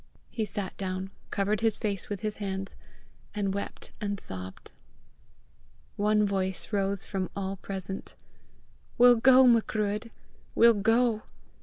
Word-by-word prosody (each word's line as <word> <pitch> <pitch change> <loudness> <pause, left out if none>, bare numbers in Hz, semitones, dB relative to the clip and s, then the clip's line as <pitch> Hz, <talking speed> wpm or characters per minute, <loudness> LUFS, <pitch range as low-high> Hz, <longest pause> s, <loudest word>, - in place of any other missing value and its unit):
He 220 - -1
sat 200 -1 -5
down, 190 0 -4 0.2
covered 205 +1 0
his 225 -2 +2
face 205 -4 -3
with 205 -2 -4
his 215 -1 -2
hands, 195 -1 -4 0.6
and 200 -2 0
wept 200 - -6
and 200 -1 -2
sobbed. 95 - -7 1.2
One 210 +1 +3
voice 190 0 -2
rose 195 -1 0
from 190 -2 -3
all 195 0 -3
present: 190 0 -6 0.8
"We'll 245 0 +7
go, 260 +2 +7
Macruadh! 220 -2 +2 0.5
We'll 235 0 +7
go! 225 +2 +2
200 Hz, 125 wpm, -28 LUFS, 195-220 Hz, 1.2 s, We'll